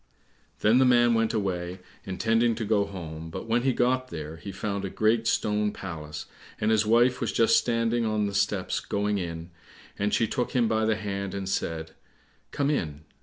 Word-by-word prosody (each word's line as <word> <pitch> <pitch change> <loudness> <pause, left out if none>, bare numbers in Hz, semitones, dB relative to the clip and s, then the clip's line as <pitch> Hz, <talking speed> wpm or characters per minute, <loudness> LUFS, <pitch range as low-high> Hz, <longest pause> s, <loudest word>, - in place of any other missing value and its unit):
Then 110 +4 +5
the - - +6
man 120 -1 +5
went 115 -1 +2
away, 90 -5 -2 0.3
intending 115 +4 +1
to 110 0 -3
go 105 -1 +2
home, 80 -5 -7
but - - -6
when 115 +2 +1
he 130 +1 +2
got 130 +1 +1
there, 80 -3 -7
he 100 - -7
found 100 +1 -3
a 95 - -2
great 110 +2 +1
stone 105 -1 +1
palace, 75 -6 -7 0.3
and 105 +1 +1
his 110 -1 +3
wife 120 +3 +4
was - - 0
just 115 - +4
standing 115 0 +1
on 110 -1 0
the 100 - -3
steps 100 -1 0
going 105 0 -1
in, 85 -1 -5 0.5
and 100 +1 +1
she 115 - +2
took 125 +1 -2
him 120 -3 +3
by 110 0 +1
the 110 0 +2
hand 100 -2 -4
and 100 -1 -4
said, 80 -4 -2 0.6
"Come 145 0 0
in." 75 - -2
105 Hz, 190 wpm, -27 LUFS, 95-115 Hz, 0.6 s, the